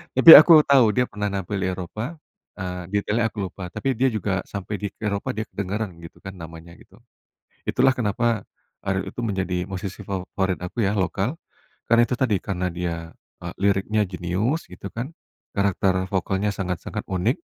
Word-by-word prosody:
Tapi 165 - +10
aku 155 0 +8
tau 135 -6 +5
dia 125 - +4
pernah 105 0 -2
nampil 100 0 -3
di 90 - 0
Eropa, 95 - -4 0.4
eee, 90 -2 -5
detailnya 105 +3 0
aku 110 - -12
lupa, 90 0 -7
tapi 135 +9 -2
dia 135 - +4
juga 105 -5 -1
sampai 100 0 -5
di 105 - -2 0.2
Eropa, 100 -1 -2
dia 110 - -2
kedengaran, 100 0 -4
gitu, 85 +4 -13
kan, 95 - -6
namanya, 80 +1 -10
gitu. - - -19 0.7
Itulah 130 +1 +4
kenapa 115 -1 0 0.4
Ariel 95 -1 -1
itu 120 - -5
menjadi 95 -4 -2
musisi 95 +1 -5
favorit 95 -1 -2
aku, 115 +6 -3
ya, 105 0 +1
lokal, 95 - -1 0.5
karena 115 +1 +5
itu 125 - 0
tadi, 115 -7 +2
karena 90 -2 -2
dia, 85 -1 -2 0.5
eee, - - -6
liriknya 100 +2 +2
jenius, 95 - -1
gitu, 95 +2 -9
kan, 120 - -6 0.4
karakter 95 -1 +1
vokalnya 95 +1 0
sangat-sangat 90 -3 -4
unik, 95 +7 0
100 Hz, 165 wpm, -23 LUFS, 95-110 Hz, 0.7 s, Tapi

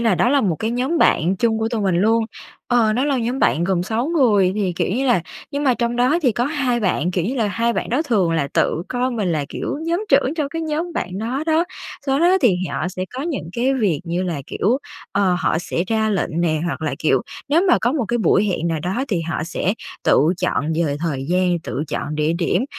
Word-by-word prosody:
là 225 -4 +3
đó 240 - +2
là 280 +1 +3
một 185 - 0
cái 220 - -2
nhóm 260 +8 0
bạn 180 - +3
chung 220 +2 +1
của 220 0 0
tụi 230 -2 -2
mình 190 -3 +1
luôn, 225 +5 +3 0.4
ờ, 235 -3 +3
đó 250 +5 +1
là 285 -2 +1
nhóm 240 +3 -1
bạn 170 - +2
gồm 180 -1 +1
6 225 +7 -1
người 220 - +3
thì, 200 -4 0
kiểu - - 0
như 265 +5 0
là 240 -8 +3 0.3
nhưng 285 0 -2
mà 260 -3 +4
trong 235 0 -1
đó 255 +7 +3
thì 255 -5 +3
có 240 - 0
2 265 -4 0
bạn, 180 -4 0
kiểu 180 -2 -1
như 240 +8 -1
là, 230 -5 +1
2 230 +4 0
bạn - - -3
đó 255 +6 +1
thường 210 - +1
là 155 -4 0
tự 165 - +1
coi 250 +1 -1
mình 210 -8 -1
là, 150 -3 -1
kiểu, - - -4
nhóm 340 +5 -1
trưởng 275 +1 +3
trong 300 -3 -1
cái 330 +3 -4
nhóm 320 +2 -2
bạn 185 - -3
đó 245 +6 -2
đó. 320 +1 +3 0.4
Do 270 0 +2
đó 350 +4 +4
thì 205 - +4
họ - - -2
sẽ 185 0 -4
có 260 - -3
những 300 - -3
cái 255 +5 +1
việc 200 - +1
như 175 +1 -2
là 170 -6 -3
kiểu, 235 +7 0 0.3
ờ, 195 -3 +2
họ 160 - +1
sẽ 170 0 -2
ra 220 0 +1
lệnh 175 -4 -1
nè, 160 -3 +1
hoặc 170 - -3
là, 155 - -1
kiểu, 135 -5 +2 0.3
nếu 315 +5 +3
mà 350 - +5
có 240 - +1
một 280 -5 0
cái 240 - 0
buổi 195 0 +3
hẹn 175 -4 -1
nào 165 -2 -1
đó 190 - -2
thì 185 -6 0
họ 165 -1 -3
sẽ 185 +3 -1 0.3
tự - - +5 0.2
chọn 160 -4 0
về 145 -2 -1
thời 145 -5 -2
gian, 180 0 +2
tự 145 - -3
chọn 150 - -3
địa 150 +1 +1
điểm. 180 +7 +1
220 Hz, 250 wpm, -20 LUFS, 175-260 Hz, 0.4 s, mà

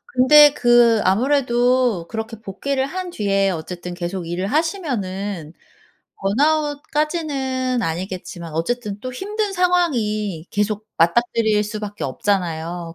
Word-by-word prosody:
근데 290 +4 +7
그 240 -4 +4
아무래도 245 -2 +2
그렇게 225 0 -5
복귀를 265 +7 -2
한 365 +5 -5
뒤에 195 - +1
어쨌든 175 +1 -6
계속 175 0 -4
일을 175 +3 -2
하시면은 205 - -2 0.7
번아웃까지는 290 - 0
아니겠지만 175 -1 -5
어쨌든 210 +4 -2
또 255 +2 -6
힘든 415 - -3
상황이 230 - 0
계속 210 +1 -1
맞닥뜨릴 220 +4 +2
수밖에 210 -1 -5
없잖아요. 170 +1 -2
220 Hz, 280 characters per minute, -21 LUFS, 190-275 Hz, 0.7 s, 근데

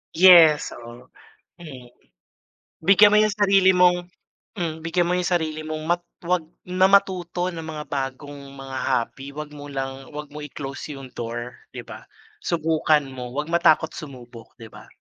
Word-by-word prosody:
Yes, 165 -4 +7
oo, 120 +1 -11 0.5
mm. 135 -8 -11 1.0
Bigyan 205 +3 +6
mo - - +6
yung 215 -1 +2
sarili 195 -2 +4
mong, 180 0 +3 0.5
hmm, 160 -2 -3
bigyan 170 +1 0
mo 180 - 0
yung 180 -1 -1
sarili 155 -2 -1
mong 155 0 -5
mat 175 0 +1 0.2
‘wag 175 -1 0 0.2
na 185 +1 +3
matuto 185 -2 +1
ng 165 - -7
mga 155 -1 -6
bagong 140 +1 -5
mga 135 -1 -7
hobby. 135 +4 -2
Huwag 150 -1 -7
mo 145 -1 -10
lang 135 -1 -6
‘wag 150 -1 -7
mo 150 - -8
i-close 140 0 -7
yung 135 -2 -11
door, 120 +1 -5 0.2
‘di - - -6
ba? - - -12 0.3
Subukan 155 -3 +1
mo. 125 -2 -7
Huwag 150 +3 -3
matakot 160 -1 +3
sumubok, 125 -5 -11
‘di 115 -3 -13
ba? - - -14
155 Hz, 160 wpm, -23 LUFS, 135-175 Hz, 1.0 s, Yes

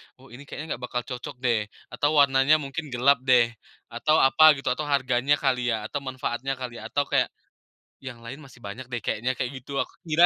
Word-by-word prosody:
"Oh 130 -1 -19
ini 140 +3 -12
kayaknya 160 +3 -5
gak - - -13
bakal 125 -1 -2
cocok 125 0 -7
deh," 110 -4 +1 0.2
atau, 145 +4 +1
"warnanya 135 +2 +5
mungkin 145 +3 -5
gelap 130 +2 +4
deh," 120 -2 +5 0.4
atau 155 +7 +1
apa 155 +3 +7
gitu 135 - -3
atau 150 +4 -2
harganya 135 0 +2
kali 125 -4 0
ya 110 -1 -3
atau 145 - -3
manfaatnya 130 0 -3
kali 120 -2 -6
atau 115 +6 -1
kayak - - +2 0.7
yang 130 -3 -8
lain 135 +5 -7
masih 130 -3 -15
banyak 115 +6 -7
deh 120 - -3
kayaknya 120 +5 -1
kayak 125 +1 -2
gitu 140 +2 -6
aku - - -2
kira 165 +2 +5
130 Hz, 200 wpm, -25 LUFS, 120-140 Hz, 0.7 s, apa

